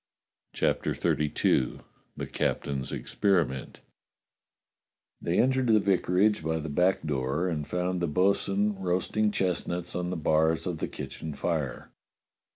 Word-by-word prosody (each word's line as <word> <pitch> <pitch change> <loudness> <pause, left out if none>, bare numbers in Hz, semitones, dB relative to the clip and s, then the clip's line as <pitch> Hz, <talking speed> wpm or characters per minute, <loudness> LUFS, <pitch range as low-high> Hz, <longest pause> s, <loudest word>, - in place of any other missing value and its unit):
CHAPTER - - 0
XXXII 75 -5 +1 0.4
THE - - -3
captain's 70 -2 -2
EXPERIMENT 85 - 0 1.4
THEY 85 - 0
entered 130 0 +3
the 110 -2 +5
vicarage 100 0 +2
by 80 +1 0
the 80 0 -4
back 90 +5 +2
door 70 +4 0
and 75 -4 -2
found 90 0 -1
the 85 - +1
bo'sun 100 +4 +1
roasting 95 +4 +1
chestnuts 90 -3 -2
on 90 0 -2
the 90 - -2
bars 80 +1 +2
of 90 -4 -3
the - - -1
kitchen 80 -3 -7
fire. 75 -7 -2
90 Hz, 125 wpm, -28 LUFS, 80-95 Hz, 1.4 s, the